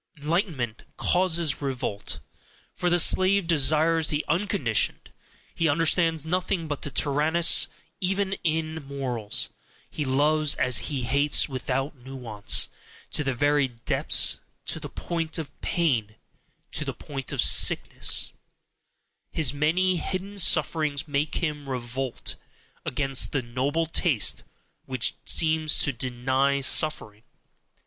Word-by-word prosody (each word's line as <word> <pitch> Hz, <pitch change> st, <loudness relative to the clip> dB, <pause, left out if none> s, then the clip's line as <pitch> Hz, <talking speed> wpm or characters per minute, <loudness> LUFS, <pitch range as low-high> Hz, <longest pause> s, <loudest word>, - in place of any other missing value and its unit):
"Enlightenment" 150 Hz, -, -2 dB, 0.2 s
causes 170 Hz, -5 st, +1 dB
revolt, 125 Hz, -7 st, -4 dB, 0.5 s
for 180 Hz, -, -1 dB
the 175 Hz, -, +3 dB
slave 185 Hz, +2 st, +4 dB
desires 160 Hz, 0 st, +3 dB
the 150 Hz, 0 st, -1 dB
unconditioned, 170 Hz, -, 0 dB, 0.4 s
he 165 Hz, -1 st, +1 dB
understands 165 Hz, +1 st, +2 dB
nothing 180 Hz, 0 st, -1 dB
but 145 Hz, -2 st, -4 dB
the 145 Hz, -, -1 dB
tyrannous, 150 Hz, +4 st, +2 dB, 0.3 s
even 195 Hz, +1 st, -1 dB
in 160 Hz, -1 st, -1 dB
morals, 125 Hz, -6 st, -2 dB, 0.4 s
he 150 Hz, -, -3 dB
loves 145 Hz, +2 st, +2 dB
as 125 Hz, -2 st, +3 dB
he 135 Hz, -4 st, -2 dB
hates, 140 Hz, +4 st, +2 dB
without 135 Hz, +2 st, -3 dB
NUANCE, 125 Hz, -5 st, -2 dB, 0.4 s
to 150 Hz, -, -1 dB
the 135 Hz, -2 st, -1 dB
very 145 Hz, +1 st, +2 dB
depths, 115 Hz, -2 st, 0 dB, 0.3 s
to -, -, +1 dB
the -, -, -7 dB
point 165 Hz, -2 st, -3 dB
of 155 Hz, -4 st, -5 dB
pain, 120 Hz, -11 st, 0 dB, 0.6 s
to -, -, -2 dB
the -, -, -5 dB
point 135 Hz, -2 st, -6 dB
of -, -, -5 dB
sickness -, -, +3 dB, 1.0 s
his 145 Hz, -5 st, +1 dB
many 175 Hz, +5 st, +1 dB
HIDDEN 195 Hz, +4 st, -4 dB
sufferings 155 Hz, -3 st, +2 dB
make 145 Hz, +1 st, -1 dB
him 150 Hz, -4 st, -3 dB
revolt 125 Hz, 0 st, -4 dB, 0.5 s
against 135 Hz, 0 st, +1 dB
the 135 Hz, -3 st, 0 dB
noble 135 Hz, +7 st, -1 dB
taste 160 Hz, -, +1 dB, 0.4 s
which 130 Hz, -3 st, -1 dB
seems 155 Hz, -1 st, +3 dB
to 140 Hz, -, +2 dB
DENY 130 Hz, +3 st, 0 dB
suffering. 120 Hz, -8 st, +1 dB
150 Hz, 120 wpm, -26 LUFS, 130-165 Hz, 1.0 s, slave